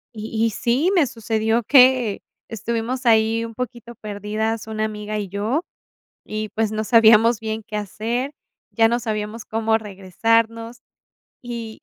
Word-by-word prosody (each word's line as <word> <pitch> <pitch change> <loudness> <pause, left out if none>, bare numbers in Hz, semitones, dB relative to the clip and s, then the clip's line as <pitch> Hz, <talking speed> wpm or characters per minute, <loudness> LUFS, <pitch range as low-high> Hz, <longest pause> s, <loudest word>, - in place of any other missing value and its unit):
Y 220 +1 -3
y - - +2
sí, 245 - +1
me 345 -6 +4
sucedió 225 -1 -1
que 255 -4 +5 0.3
estuvimos 235 +4 -3
ahí 225 0 +3
un 230 - -8
poquito 240 -1 -6
perdidas 215 +1 -3
una 215 0 -3
amiga 215 0 -4
y 205 -2 -4
yo, 215 - -1 0.6
y 215 0 -4
pues 220 0 -1
no 215 0 -2
sabíamos 225 0 +5
bien 220 0 -4
qué 215 - -6
hacer, 225 +7 -3 0.4
ya 225 -1 +4
no 235 +1 0
sabíamos 215 -1 -4
cómo 220 0 0
regresarnos. 225 +4 -1 0.6
Y 235 -2 -7
225 Hz, 140 wpm, -21 LUFS, 215-235 Hz, 0.6 s, que